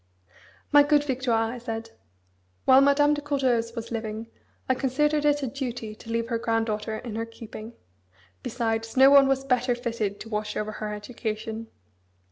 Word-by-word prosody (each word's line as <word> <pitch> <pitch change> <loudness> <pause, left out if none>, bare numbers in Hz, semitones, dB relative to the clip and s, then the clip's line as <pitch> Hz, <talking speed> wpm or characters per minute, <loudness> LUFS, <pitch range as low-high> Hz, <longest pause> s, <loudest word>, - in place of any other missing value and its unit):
"My 290 -1 +8
good 290 0 +3
Victoire," 245 -5 0
I 250 - -7
said, 225 -1 -5 0.7
"while 260 +1 +7
Madame 285 +1 +4
de 295 - -2
Courteheuse 255 -5 0
was 230 0 -6
living, 225 0 -4 0.4
I 260 - +3
considered 295 +3 +1
it 290 -1 +2
a - - 0
duty 245 -4 -5
to 220 +1 -13
leave 230 0 -1
her 230 -2 0
granddaughter 220 -1 -1
in 235 -1 -7
her 225 - -2
keeping. 225 0 -10 0.7
Besides, 225 - -2
no 265 +1 +8
one 280 -1 +8
was 270 0 +1
better 250 -1 +1
fitted 230 -4 -3
to 225 - -8
watch 210 -1 -3
over 210 0 -2
her 215 0 -5
education. 220 +1 -5
230 Hz, 165 wpm, -26 LUFS, 225-270 Hz, 0.7 s, My